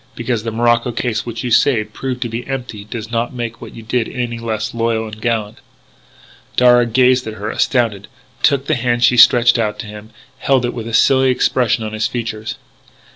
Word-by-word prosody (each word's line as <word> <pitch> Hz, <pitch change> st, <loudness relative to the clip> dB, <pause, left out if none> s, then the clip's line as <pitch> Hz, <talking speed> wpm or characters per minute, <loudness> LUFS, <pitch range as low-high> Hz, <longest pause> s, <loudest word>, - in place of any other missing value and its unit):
Because 120 Hz, -1 st, -2 dB
the 115 Hz, -, -4 dB
morocco 120 Hz, +1 st, +1 dB
case 115 Hz, -1 st, -2 dB
which 115 Hz, +1 st, -5 dB
you 125 Hz, -, -3 dB
saved 110 Hz, -3 st, +2 dB
proved 130 Hz, -2 st, -4 dB
to -, -, -3 dB
be 115 Hz, +1 st, -6 dB
empty 125 Hz, -6 st, -5 dB
does 110 Hz, +1 st, -7 dB
not 120 Hz, +2 st, -2 dB
make 115 Hz, -1 st, -5 dB
what -, -, -10 dB
you 115 Hz, -, -10 dB
did 115 Hz, +1 st, -1 dB
any 120 Hz, -2 st, -4 dB
the -, -, -11 dB
less 110 Hz, -1 st, -3 dB
loyal 115 Hz, -1 st, -1 dB
and 110 Hz, 0 st, -10 dB
gallant." 110 Hz, -2 st, -2 dB, 1.0 s
Darragh 120 Hz, -1 st, +5 dB
gazed 125 Hz, 0 st, +3 dB
at 110 Hz, -, -5 dB
her, 105 Hz, +1 st, -4 dB
astounded; 110 Hz, -6 st, 0 dB, 0.3 s
took 140 Hz, -1 st, +2 dB
the -, -, 0 dB
hand 120 Hz, -1 st, 0 dB
she 125 Hz, -, +5 dB
stretched 120 Hz, 0 st, +6 dB
out 105 Hz, -2 st, -1 dB
to 105 Hz, -, -7 dB
him; 105 Hz, +1 st, -10 dB, 0.3 s
held 135 Hz, -3 st, +2 dB
it 120 Hz, -, -3 dB
with 115 Hz, -2 st, -6 dB
a 115 Hz, -, -6 dB
silly 130 Hz, +2 st, +4 dB
expression 125 Hz, -2 st, +1 dB
on 110 Hz, 0 st, -5 dB
his 110 Hz, 0 st, 0 dB
features. 110 Hz, -2 st, -5 dB
115 Hz, 205 wpm, -17 LUFS, 110-125 Hz, 1.0 s, stretched